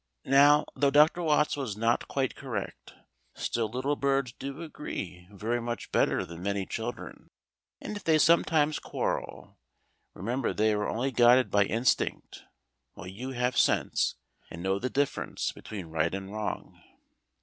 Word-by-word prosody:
Now, 145 Hz, +2 st, +6 dB
though 140 Hz, -, +3 dB
Dr. 150 Hz, +5 st, +5 dB
Watts 150 Hz, -2 st, +2 dB
was 130 Hz, -8 st, -4 dB
not 115 Hz, +2 st, +1 dB
quite 135 Hz, -2 st, -1 dB
correct, 115 Hz, -8 st, -6 dB, 0.4 s
still 115 Hz, -2 st, -2 dB
little 130 Hz, +5 st, -1 dB
birds 135 Hz, -3 st, 0 dB
do 140 Hz, +6 st, -7 dB
agree 90 Hz, -, -7 dB
very 115 Hz, +4 st, -2 dB
much 120 Hz, 0 st, -5 dB
better -, -, +2 dB
than 85 Hz, 0 st, -10 dB
many 100 Hz, 0 st, -1 dB
children; 115 Hz, +4 st, -6 dB, 0.5 s
and 215 Hz, -, -6 dB
if 205 Hz, -, -7 dB
they 160 Hz, -1 st, +4 dB
sometimes 155 Hz, -1 st, +3 dB
quarrel, -, -, -4 dB, 0.6 s
remember 120 Hz, +7 st, -2 dB
they 110 Hz, 0 st, +2 dB
are 105 Hz, 0 st, -1 dB
only 130 Hz, +4 st, -1 dB
guided 125 Hz, +1 st, +5 dB
by 100 Hz, -1 st, +4 dB
instinct, 115 Hz, +5 st, -1 dB, 0.5 s
while 85 Hz, -, -10 dB
you 120 Hz, +9 st, -6 dB
have 125 Hz, 0 st, 0 dB
sense, -, -, +2 dB, 0.3 s
and 85 Hz, -, -8 dB
know 95 Hz, +1 st, 0 dB
the 130 Hz, -, -2 dB
difference 140 Hz, +1 st, -1 dB
between 100 Hz, -5 st, -8 dB
right 80 Hz, +2 st, -1 dB
and 95 Hz, +1 st, -7 dB
wrong. 110 Hz, 0 st, -5 dB
120 Hz, 150 wpm, -29 LUFS, 100-140 Hz, 0.6 s, Now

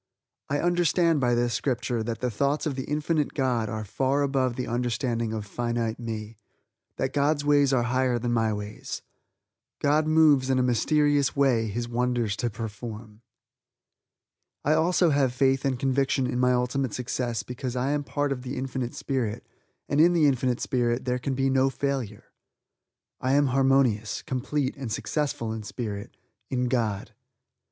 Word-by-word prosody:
I 145 Hz, +1 st, 0 dB
understand 175 Hz, -2 st, +2 dB
by 120 Hz, -2 st, +2 dB
this 120 Hz, 0 st, +1 dB
Scripture 120 Hz, -3 st, -1 dB
that 115 Hz, +1 st, -4 dB
the 125 Hz, -1 st, 0 dB
thoughts 140 Hz, +8 st, 0 dB
of 150 Hz, -, 0 dB
the 130 Hz, 0 st, -4 dB
Infinite 150 Hz, 0 st, -1 dB
God 125 Hz, -6 st, 0 dB
are 110 Hz, 0 st, -3 dB
far 135 Hz, +7 st, 0 dB
above 130 Hz, -3 st, 0 dB
the 125 Hz, -, -3 dB
understanding 120 Hz, -1 st, -1 dB
of 110 Hz, -2 st, -4 dB
finite 120 Hz, +1 st, -2 dB
me; 110 Hz, -2 st, -6 dB, 0.6 s
that 130 Hz, 0 st, -2 dB
God's 145 Hz, +1 st, +1 dB
ways 145 Hz, -2 st, +4 dB
are 125 Hz, -3 st, +2 dB
higher 125 Hz, 0 st, +1 dB
than 120 Hz, 0 st, -1 dB
my 115 Hz, -1 st, +2 dB
ways. 105 Hz, 0 st, -6 dB, 0.7 s
"God 150 Hz, +2 st, +2 dB
moves 155 Hz, -4 st, +4 dB
in 130 Hz, -, +3 dB
a 130 Hz, -, +3 dB
mysterious 145 Hz, +3 st, +2 dB
way 130 Hz, -5 st, +3 dB
His 120 Hz, +3 st, -3 dB
wonders 120 Hz, -3 st, 0 dB
to 120 Hz, -, -1 dB
perform." 110 Hz, 0 st, -7 dB, 1.4 s
I 150 Hz, -, +4 dB
also 170 Hz, +1 st, +3 dB
have 135 Hz, -3 st, +2 dB
faith 135 Hz, 0 st, +2 dB
and 135 Hz, -2 st, +1 dB
conviction 135 Hz, +1 st, +1 dB
in 125 Hz, 0 st, -1 dB
my 125 Hz, 0 st, +4 dB
ultimate 125 Hz, 0 st, 0 dB
success 120 Hz, -2 st, -2 dB
because 125 Hz, 0 st, -5 dB
I 130 Hz, +3 st, 0 dB
am 145 Hz, -, +1 dB
a -, -, -11 dB
part 145 Hz, 0 st, -1 dB
of 130 Hz, -2 st, -2 dB
the 130 Hz, +2 st, -5 dB
Infinite 130 Hz, -1 st, -3 dB
Spirit, 120 Hz, -5 st, -2 dB, 0.4 s
and 145 Hz, -, +3 dB
in 175 Hz, +2 st, +6 dB
the 165 Hz, -3 st, +4 dB
Infinite 130 Hz, -3 st, +1 dB
Spirit, 120 Hz, 0 st, 0 dB
there 125 Hz, 0 st, 0 dB
can 135 Hz, +1 st, -2 dB
be 135 Hz, +1 st, +1 dB
no 135 Hz, 0 st, +3 dB
failure. 135 Hz, -7 st, -3 dB, 0.9 s
I 130 Hz, +1 st, 0 dB
am 145 Hz, +1 st, +4 dB
harmonious, 130 Hz, -6 st, +2 dB
complete 135 Hz, +1 st, -2 dB
and 130 Hz, -5 st, -5 dB
successful 115 Hz, -2 st, -2 dB
in 110 Hz, -, -5 dB
Spirit 105 Hz, -1 st, -6 dB, 0.3 s
in 125 Hz, -1 st, 0 dB
God. 110 Hz, -6 st, -1 dB
130 Hz, 165 wpm, -26 LUFS, 120-140 Hz, 1.4 s, in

